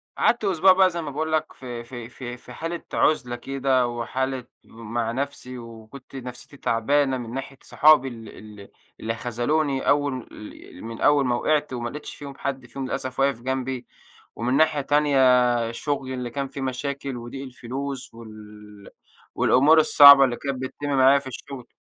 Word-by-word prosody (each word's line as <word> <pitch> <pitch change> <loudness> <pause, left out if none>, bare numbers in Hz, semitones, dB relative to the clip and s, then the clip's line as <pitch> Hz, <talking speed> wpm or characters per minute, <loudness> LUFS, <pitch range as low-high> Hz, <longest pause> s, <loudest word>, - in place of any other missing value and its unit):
قعدت 235 -2 +2
أسبوع 190 0 +5
بقى 185 0 +4
زي 170 -1 -4
ما 150 -3 -6
باقول 155 +3 -3
لك 155 0 -1
في 120 -2 -8
في 120 -1 -9
في 125 -1 -8
في 125 0 -13
حالة 165 +4 -5
عُزلة 125 -6 +1
كده 130 0 0
وحالة 125 +2 -3 0.2
مع 115 0 -4
نَفْسي 130 0 -5
وكنت 115 +3 -12
نَفْسيتي 130 +3 -9
تعبانة 135 +3 +1
من 120 -1 -7
ناحية 135 +1 -6
صحابي 150 -3 +5
ال 115 -4 -9 0.3
ال 100 - -13 0.3
اللي 115 +1 -3
خذلوني 135 +5 -1
أول 145 -3 0
ال 105 -3 -12
من 115 0 -8
أول 145 -2 +4
ما 120 -1 +1
وقعت 150 +2 0
وما 120 -1 -3
لقيتش 150 +3 -8
فيهم 140 -1 -10
حد 135 -2 -4
فيهم 135 +1 -6
للأسف 130 -1 -4
واقف 135 -3 +1
جنبي، 130 0 -3 0.5
ومن 120 +3 -1
ناحية 155 -2 +3
تانية 130 -5 +3
شُغلي 135 +1 -3
اللي 125 -1 -4
كان 140 +3 -4
فيه 135 - -8
مشاكل 135 0 -4
وضِيق 120 +3 -7
الفلوس 130 0 -6
وال 105 -2 -13 0.5
والأمور 145 +6 +5
الصعبة 140 -2 +9
اللي 125 -2 +1
كانت 135 0 -4
بتتم 140 +2 -5
معايا 135 0 +5
في 140 - -11
الشُغل. 130 0 -9
130 Hz, 165 wpm, -24 LUFS, 120-140 Hz, 0.5 s, الصعبة